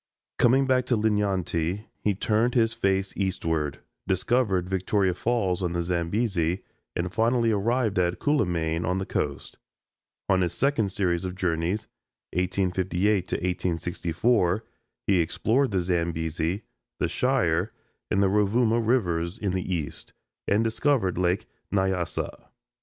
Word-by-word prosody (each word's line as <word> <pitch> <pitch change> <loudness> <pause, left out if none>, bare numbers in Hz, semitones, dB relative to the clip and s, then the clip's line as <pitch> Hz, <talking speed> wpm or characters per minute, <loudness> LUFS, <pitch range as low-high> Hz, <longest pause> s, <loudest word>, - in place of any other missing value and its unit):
Coming 130 +3 +5
back 130 -1 +2
to 120 - +2
Linyanti, 100 -3 0 0.2
he 105 -2 +2
turned 110 +5 +1
his 115 -2 +3
face 95 0 0
eastward, 80 -6 -1 0.3
discovered 95 -1 +1
Victoria 95 0 +1
Falls 95 -3 0
on 90 -2 -1
the 85 0 0
Zambesi, 90 0 0 0.3
and 90 +1 -2
finally 115 0 +2
arrived 110 0 +1
at 90 -1 +1
Cuilimane 85 - 0
on 90 +3 0
the 95 - -2
coast. - - -3 0.7
On 95 -1 +3
his 90 -1 0
second 120 -8 +1
series 90 -3 0
of 90 -1 -4
journeys 90 +3 -1 0.5
(1858 95 +1 +1
1864) 90 +3 0 0.4
he 95 -4 +4
explored 115 - +1
the 95 -3 0
Zambesi, 85 +1 -1 0.3
the - - 0
Shire, 110 -8 +1 0.4
and 100 - +2
the - - +4
Rovuma 110 +4 +2
rivers 95 -7 +1
in 100 -4 -1
the 95 0 -2
East, 80 -5 -4 0.3
and 105 +3 +3
discovered 115 - +1
Lake 90 +2 +1 0.3
Nyasa. 95 -3 -1
95 Hz, 125 wpm, -26 LUFS, 90-110 Hz, 0.7 s, Coming